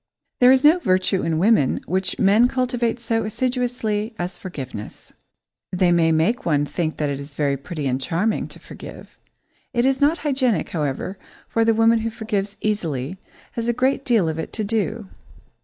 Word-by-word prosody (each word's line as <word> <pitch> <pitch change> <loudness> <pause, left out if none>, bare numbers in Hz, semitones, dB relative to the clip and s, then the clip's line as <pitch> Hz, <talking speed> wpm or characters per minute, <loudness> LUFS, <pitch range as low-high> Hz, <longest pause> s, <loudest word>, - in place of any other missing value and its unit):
There 250 0 +7
is 265 +1 +4
no 320 +4 +7
virtue 185 - +1
in 165 -1 0
women 190 - +3
which 185 +2 -1
men 210 +5 +5
cultivate 245 -2 -1
so 225 -1 -1
assiduously 230 -2 -1
as 175 0 -4
forgiveness. 130 - -8 0.6
They 180 -1 +2
make 165 +6 +2
one 145 -4 +1
think 160 +1 -3
that 150 -2 -1
it 140 - -3
is 140 +1 -10
very 140 -2 +1
pretty 145 +2 -6
and 130 0 0
charming 180 - 0
to - - -12
forgive. - - -12 0.6
It 240 +1 +3
is 270 0 +1
not 300 +4 +4
hygienic, 260 - +1
however, 155 +5 -3 0.3
for 230 - +1
the 225 0 +3
woman 225 +1 +4
who 225 +1 -2
forgives 210 -3 -3
easily 170 -6 -2 0.3
has 230 0 -3
a 240 - +2
great 265 +3 +1
deal 225 -10 +2
of 160 0 -2
it 160 - -5
to 220 - -2
do. 220 0 -2
210 Hz, 175 wpm, -22 LUFS, 165-235 Hz, 0.6 s, There